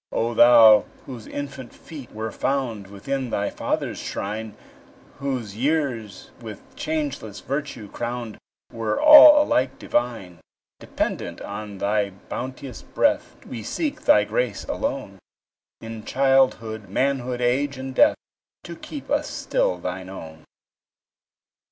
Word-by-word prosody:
O 115 +1 -1
Thou, 115 -3 +7 0.2
whose 125 -5 -9
infant 140 -3 -7
feet 145 -7 -11
were 110 +1 -5
found 120 -8 -2
Within 130 +7 -4
thy 100 -2 -1
Father's - - -3
shrine, 105 +2 -5 0.6
Whose 130 -7 -3
years, 130 -5 -2
with - - -11
changeless 145 -9 -4
virtue 140 -5 -4
crowned, 120 0 -5 0.3
Were 110 -2 -2
all 300 0 +10
alike 130 - 0
divine; 115 -8 -2 0.4
Dependent - - -3
on 100 0 -7
thy 100 +1 0
bounteous 125 +6 -7
breath, - - 0
We 120 -3 -7
seek 290 - -3
thy - - +5
grace - - -2
alone, 130 - -4 0.6
In 115 -1 -8
childhood, 130 -5 +1
manhood, 130 +2 -1
age, 130 +3 0
and 130 0 -6
death, - - +4 0.5
To - - -8
keep - - -9
us - - 0
still 90 - -1
thine 90 +1 -6
own. 80 -4 -10
120 Hz, 120 wpm, -23 LUFS, 105-135 Hz, 0.6 s, all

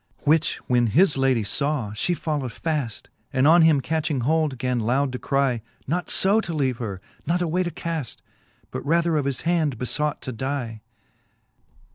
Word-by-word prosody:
XVIII. - - -36
Which 155 +2 +3
when 120 -1 +3
his 155 - +4
ladie 135 -4 +2
faw, 130 +1 -1
Ihe 165 +11 -1
follow'd 145 -5 -2
faft, 145 -4 -3 0.3
And 130 -1 +2
on 170 +2 +7
him 160 -3 +5
catching 155 -3 -1
hold, 155 +1 +1
gan 125 0 -1
loud 130 +5 +1
to 125 - -5
crle 135 -4 +1 0.3
Not 175 +5 -2
{o 205 +3 +4
to 170 - -4
leave 130 -5 0
her, 100 -6 -4 0.3
nor 175 +1 +1
away 175 +2 0
to 175 - -1
caft, 165 -6 -5 0.5
But - - -5
rather 170 +2 +2
of 145 -3 +1
his 135 -3 -1
hand 160 -6 +1
befought 150 +5 -1
to 130 - -4
die. 120 -2 -4
140 Hz, 175 wpm, -24 LUFS, 125-160 Hz, 0.5 s, on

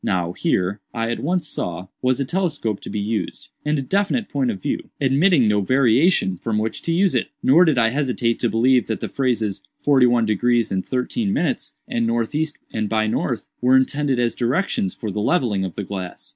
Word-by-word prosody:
Now 90 -3 0
here, 95 +2 -1 0.2
I 115 0 -1
at 120 - -3
once 175 +1 -1
saw, 90 - -4 0.2
was 130 0 +1
a 140 - 0
telescope 150 - -1
to - - -9
be 105 - -3
used, 105 +2 -3
and 150 +1 0
a 135 - -2
definite 200 - 0
point 135 -3 0
of 100 -5 -3
view, - - -3
admitting 140 - +3
no 105 -1 +2
variation, 130 - +3
from 110 +3 -2
which 110 +1 -2
to 165 - -2
use 185 +3 +2
it. - - 0 0.2
Nor 165 +7 +6
did 155 -5 +2
I 115 -2 +4
hesitate 125 -3 0
to 120 - +1
believe 125 +3 +3
that 110 - -2
the - - -3
phrases, 115 -7 -1 0.2
'forty 135 -4 +4
one 120 -1 +3
degrees 115 +2 +1
and 95 -1 -1
thirteen 195 - -2
minutes,' 175 -6 -1
and 115 -1 0
'northeast 120 +7 -1 0.2
and 110 -2 -2
by 110 -1 +1
north,' 110 - -2
were 130 +1 +5
intended 135 0 +1
as 120 -1 +1
directions 120 - -1
for 110 -4 -5
the 105 - -3
levelling 115 - +1
of 95 -3 -5
the 100 - -3
glass. 95 -2 -7
120 Hz, 205 wpm, -21 LUFS, 110-145 Hz, 0.2 s, Nor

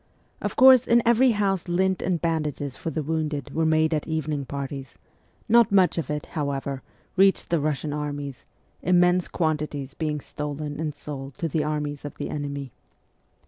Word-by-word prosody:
Of - - -3
course, 260 -2 +7
in 235 0 +4
every 240 +3 +5
house 195 -3 0
lint 185 +1 +1
and 180 -3 0
bandages 150 -5 -2
for - - -4
the 160 -1 -3
wounded 155 -2 -2
were 160 0 +1
made 160 0 +3
at 150 - -1
evening 155 -3 -2
parties; 140 -2 -6 0.5
not 235 -2 +5
much 185 -3 +4
of 150 - -4
it, 150 0 -3
however, 140 -2 -2 0.3
reached 195 -1 +3
the 170 - +3
Russian 150 0 -1
armies, 145 -2 -4 0.4
immense 180 0 +3
quantities 150 -4 -2
being 150 -1 -2
stolen 145 +1 -5
and 155 -2 -3
sold 135 -3 -8
to 165 - -1
the 155 0 0
armies 150 -1 -3
of 145 - -7
the - - -5
enemy. 140 -2 -4
155 Hz, 165 wpm, -25 LUFS, 145-175 Hz, 0.5 s, course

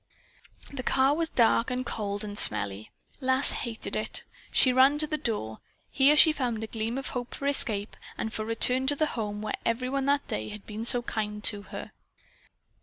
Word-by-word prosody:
The 270 - -4
car 265 +2 +3
was 330 0 -1
dark 230 -2 +3
and 250 0 -2
cold 205 -3 -3
and 205 -1 -6
smelly. 100 - 0 0.3
Lass 260 0 +3
hated 230 -3 -5
it. - - -1 0.3
She 255 - +4
ran 265 +3 +5
to 305 - +1
its 305 -1 -2
door. 110 - -2 0.3
Here 285 +2 +4
she 315 - +8
found 240 -6 -2
a - - -2
gleam 225 +2 -4
of 270 - -5
hope 245 -1 -5
for 280 - -6
escape 225 -7 0 0.2
and 220 - -4
for 215 - -3
return 250 +4 +2
to 290 - +2
the 310 - +1
home 210 -2 -4
where 215 - -3
every 240 +2 -1
one 275 0 -1
that 280 0 +1
day 110 +1 -4
had 210 -1 -9
been 215 +1 -6
so 240 0 +3
kind 210 -2 -4
to 205 -3 +4
her. - - -7
240 Hz, 195 wpm, -28 LUFS, 215-270 Hz, 0.3 s, she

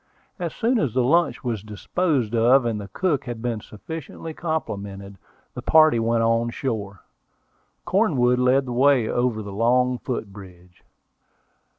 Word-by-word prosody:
As 170 -2 -4
soon 240 +1 +1
as 135 - -1
the 130 - +3
lunch 170 +7 +2
was 115 -5 -2
disposed 120 - -1
of, 120 +3 +4
and 110 -3 -2
the 100 - -8
cook 145 - -1
had 120 -2 -5
been 115 -2 -3
sufficiently 160 +8 -8
complimented, 100 - -5 0.3
the - - -6
party 155 -6 +5
went 115 0 +1
on 115 +1 +1
shore. 105 -6 -4 0.8
Cornwood 135 - +2
led 130 +2 +3
the 125 - -6
way 130 -2 +3
over 120 -3 -1
the 100 -1 -8
long 125 +3 +2
foot 115 -6 -5
bridge. 90 -3 -14
120 Hz, 150 wpm, -23 LUFS, 110-140 Hz, 0.8 s, party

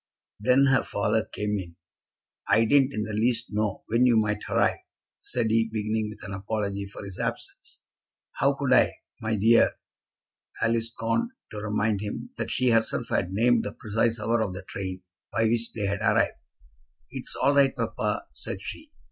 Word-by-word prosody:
Then 130 +6 +4
her 135 -2 +4
father 105 +2 0
came 105 -1 -2
in. 85 -3 -8 0.7
"I 115 - +5
didn't 135 +2 +4
in 110 -5 -2
the 110 - -5
least 115 +2 +1
know 105 0 -1
when 120 +3 +3
you 120 -2 +4
might 105 -1 +1
arrive," - - +2 0.4
said 115 -3 -1
he, 115 0 +2
beginning 110 0 -1
with 105 0 -11
an 100 -2 -6
apology 100 0 -3
for 100 - -9
his 95 -2 -8
absence. - - -5 0.5
"How 140 +1 +1
could 140 -2 +1
I, - - +5 0.3
my 110 -1 -1
dear?" 115 +3 +5 0.9
Alice 115 0 +1
scorned 115 - -1 0.2
to 105 - -5
remind 105 -1 0
him 105 -1 -5
that - - -2
she 125 -1 +2
herself 115 0 +1
had 90 - 0
named 115 +3 +3
the 105 - -5
precise 115 +2 0
hour 115 +2 +1
of 95 -4 -2
the 90 - -7
train 95 -1 -6 0.3
by 115 - +1
which 115 +1 +1
they 105 -3 -2
had 100 0 -1
arrived. - - +3 0.8
"It's - - -4
all 140 +2 +3
right, 140 -1 +4
papa," - - -2
said - - -5
she. 310 -1 -8
110 Hz, 175 wpm, -26 LUFS, 105-115 Hz, 0.9 s, I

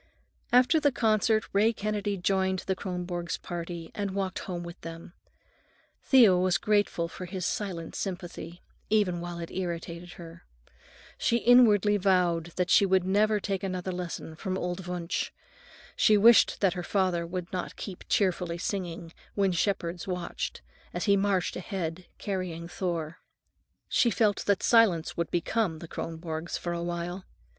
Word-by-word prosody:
After 250 +6 +5
the 290 -1 +3
concert 220 -2 +2
Ray 215 +3 +4
Kennedy 205 -1 -2
joined 190 +1 +1
the 190 - 0
Kronborgs' 180 -2 -4
party 170 -1 -6
and 200 -2 -3
walked 195 -2 -2
home 175 -2 -5
with 170 +1 -9
them. 165 +1 -9 0.9
Thea 235 -9 +7
was 185 +1 +2
grateful 205 -5 +1
for 185 +2 -8
his 180 -1 -4
silent 180 -6 -3
sympathy, 175 -2 -6 0.3
even 195 -5 +2
while 175 0 -5
it 170 -1 -6
irritated 175 -1 -5
her. 170 0 -11 0.8
She 235 - +2
inwardly 215 -4 +5
vowed 180 -4 +2
that 180 -1 0
she - - +7
would 190 -1 +3
never 210 +3 +2
take 195 -1 -2
another 185 -1 -3
lesson 175 -3 -5
from 185 +3 -3
old 180 0 -4
Wunsch. 180 +1 -2 0.7
She 215 - +5
wished 230 +3 +6
that 195 -3 +3
her 180 - -4
father 185 -2 0
would 180 +1 -5
not 180 - -4
keep 190 -4 -7
cheerfully 180 -3 +1
singing, 175 -3 -4 0.2
"When 195 -2 +2
Shepherds 175 -1 -1
Watched," 180 -2 -4 0.3
as - - -1
he 200 -2 +5
marched 195 -2 +1
ahead, 180 -2 -4
carrying 180 -4 -4
Thor. 170 -3 -3 0.7
She 240 - +3
felt 215 -3 +1
that 200 -2 +2
silence 210 -9 +4
would 170 -1 -2
become 175 0 0
the 170 - -9
Kronborgs 160 0 -5
for 175 - -3
a 170 - -3
while. 175 +2 -4
185 Hz, 150 wpm, -28 LUFS, 170-200 Hz, 0.9 s, Thea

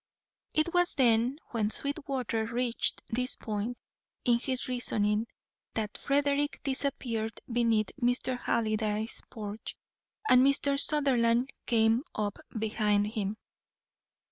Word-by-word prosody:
It 310 +3 +2
was 355 0 +3
when 240 +1 +3 0.3
Sweetwater 270 -4 -1
reached 240 0 -1
this 250 +2 -1
point 220 +3 -3 0.5
in 240 -1 +4
his 255 0 -1
reasoning 220 -3 0 0.5
that 215 -1 -2
Frederick 285 +1 +1
disappeared 255 -5 -1
beneath 230 -3 +2
Mr. 245 +1 +1
Halliday's 215 -2 -1
porch, 210 -1 -7 0.5
and 250 0 +7
Mr. 275 0 +3
Sutherland 255 -4 +3 0.2
came 225 0 +4
up 205 -1 -2 0.2
behind 210 -1 +1
him. 210 -1 -2
235 Hz, 100 wpm, -30 LUFS, 220-265 Hz, 0.5 s, and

